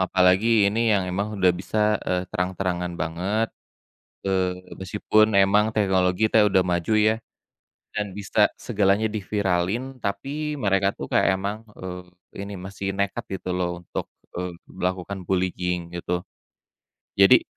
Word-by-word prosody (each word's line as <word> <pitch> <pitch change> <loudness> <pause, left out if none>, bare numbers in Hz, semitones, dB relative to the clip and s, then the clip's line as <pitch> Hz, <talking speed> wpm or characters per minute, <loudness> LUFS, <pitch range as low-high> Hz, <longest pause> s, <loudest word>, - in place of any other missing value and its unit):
apalagi 95 +4 +4
ini 115 +3 +2
yang 95 -2 +2
emang 100 +4 -2
udah 95 -2 +4
bisa, 105 +4 0
eee, 90 0 0
terang-terangan 90 -1 -1
banget. 95 +8 -1 0.8
Eee, 95 -1 +1 0.2
meskipun 105 +3 +2
emang 100 +2 +4
teknologi 95 0 +2
teh 110 -1 +5
udah 95 -2 +4
maju 90 +3 0
ya. 110 +1 +4 0.8
Dan 105 -3 -3
bisa 105 +1 +3
segalanya 105 -1 +1
diviralin 105 +4 -1
tapi 140 +10 -3
mereka 95 -5 +2
tuh - - -4
kayak - - +4
emang, 100 +2 -3 0.2
eee, 90 -1 -6 0.4
ini 100 +1 -6
masih 95 +1 -6
nekat 100 +4 -1 0.2
gitu 90 - -7
loh 90 -1 0 0.2
untuk, - - -5 0.2
eee, 90 +1 -3 0.2
melakukan 95 +2 -3
bullying 90 -2 -1
gitu. 90 0 -3 0.9
Jadi, 100 0 +7
95 Hz, 130 wpm, -24 LUFS, 90-105 Hz, 0.9 s, Jadi